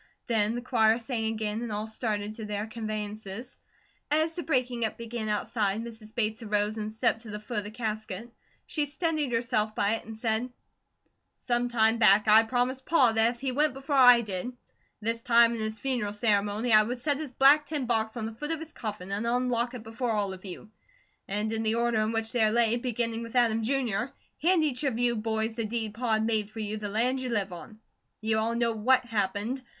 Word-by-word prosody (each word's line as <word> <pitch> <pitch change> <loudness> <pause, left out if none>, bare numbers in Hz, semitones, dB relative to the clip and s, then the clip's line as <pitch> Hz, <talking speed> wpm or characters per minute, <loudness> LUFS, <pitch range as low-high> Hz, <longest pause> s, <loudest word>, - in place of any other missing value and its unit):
Then 220 -1 +1
the 245 - -4
choir 225 -3 +3
sang 235 -2 -3
again 220 0 -2
and 235 -2 -4
all 210 +1 -2
started 215 -2 -3
to 220 0 -7
their 210 0 -3
conveyances. 215 0 -6 0.5
As 315 +2 +1
the 345 - -4
breaking 250 -6 0
up 220 - -1
began 230 -1 -4
outside, 210 -1 0
Mrs. 225 -2 -9
Bates 220 -1 0
arose 210 -1 0
and 215 -1 -4
stepped 220 0 0
to 225 - -11
the 210 0 -5
foot 215 +1 -4
of - - -5
the - - -5
casket. 220 -1 -5 0.3
She 300 -3 -1
steadied 305 -2 -1
herself 230 -2 0
by 205 +2 +2
it - - -13
and 220 0 -9
said: 225 +2 -1 0.9
"Some 240 -1 0
time 225 -1 +3
back, 210 -1 +5
I 215 +1 +8
promised 250 +3 -1
Pa 270 -8 +5
that 225 +1 +4
if - - -20
he 270 -1 -1
went 290 +1 +1
before 275 +1 -3
I 245 -3 +8
did, 195 -1 -3
at 250 - -6 0.5
this 230 +2 -1
time 235 0 +5
in 230 - -4
his 220 0 -2
funeral 225 -4 -1
ceremony 210 +2 +1
I 215 - +8
would 240 +3 -4
set 290 -2 +1
his 300 -3 -6
black 285 +3 +5
tin 290 -3 -2
box 225 -1 0
on 225 - -3
the 225 - -5
foot 295 +7 -5
of 325 - 0
his 320 0 -10
coffin 210 -4 -6
and 210 +4 -2
unlock 245 0 0
before 225 +1 -3
all 200 -2 -1
of 185 - -11
you, 205 +3 -9 0.6
and 210 +2 -2
in 225 - -1
the 220 0 +1
order 235 -2 +1
in 215 +1 0
which 225 0 -1
they 220 -3 +3
lay, 230 0 +3
beginning 235 -2 -1
with 230 +1 -8
Adam, 230 -2 +3
Jr., 240 -3 0 0.4
hand 340 +1 +4
each 290 -1 -1
of 265 -5 0
you 240 0 +1
boys 220 0 -1
the 230 0 -3
deed 220 -1 -3
Pa 230 0 -1
had 220 0 +2
made 220 -2 +1
you 215 -1 -3
for - - -7
the 205 -1 -4
land 245 +5 +1
you 255 - -3
live 200 -5 -1
on. 215 +5 -11 0.4
You 220 0 0
all 230 +1 0
know 235 0 +1
WHAT 250 +4 +2
happened. 215 +3 -1
225 Hz, 215 wpm, -28 LUFS, 215-245 Hz, 0.9 s, I